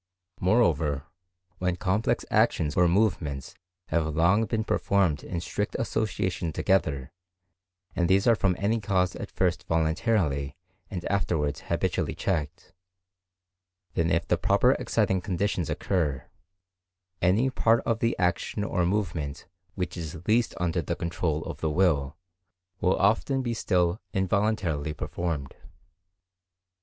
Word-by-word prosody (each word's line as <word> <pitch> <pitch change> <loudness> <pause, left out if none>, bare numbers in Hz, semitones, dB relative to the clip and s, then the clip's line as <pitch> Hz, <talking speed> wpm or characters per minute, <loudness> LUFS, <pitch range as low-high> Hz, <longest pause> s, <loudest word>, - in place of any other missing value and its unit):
Moreover, 80 - +2 0.6
when 90 -1 0
complex 95 +5 0
actions 75 -2 +2
or 90 -1 +5
movements 85 -8 0 0.4
have 80 -2 0
long 95 +7 +4
been 110 +1 -1
performed 100 -8 +1
in 85 - -4
strict 100 +3 -3
association 95 -5 -1
together, 75 -6 0 0.8
and 85 -1 +1
these 95 +1 +4
are 120 - +6
from 95 -4 +1
any 110 +3 +1
cause 95 -4 0
at - - -6
first 90 -2 -1
voluntarily 80 - 0 0.3
and 90 -4 -5
afterwards 80 -7 0
habitually - - -1
checked, 80 -7 -3 1.2
then 85 +1 +1
if 85 0 +1
the - - +1
proper - - +4
exciting 95 -1 +1
conditions 90 -2 -1
occur, 75 -9 -1 1.0
any 105 +9 +3
part 115 -2 +3
of 115 -1 0
the 115 0 0
action 90 +3 0
or 90 -3 0
movement 85 -8 -2 0.3
which 90 -1 -3
is 80 -1 -7
least 115 +2 +2
under 90 -1 0
the 75 - -3
control 85 -2 -2
of - - -6
the 80 - +1
will, 75 -4 +1 0.6
will 90 - +2
often 120 +5 +1
still 90 -3 +1
be - - -4
involuntarily 95 -6 0
performed. 80 -6 -3
90 Hz, 125 wpm, -27 LUFS, 80-100 Hz, 1.2 s, are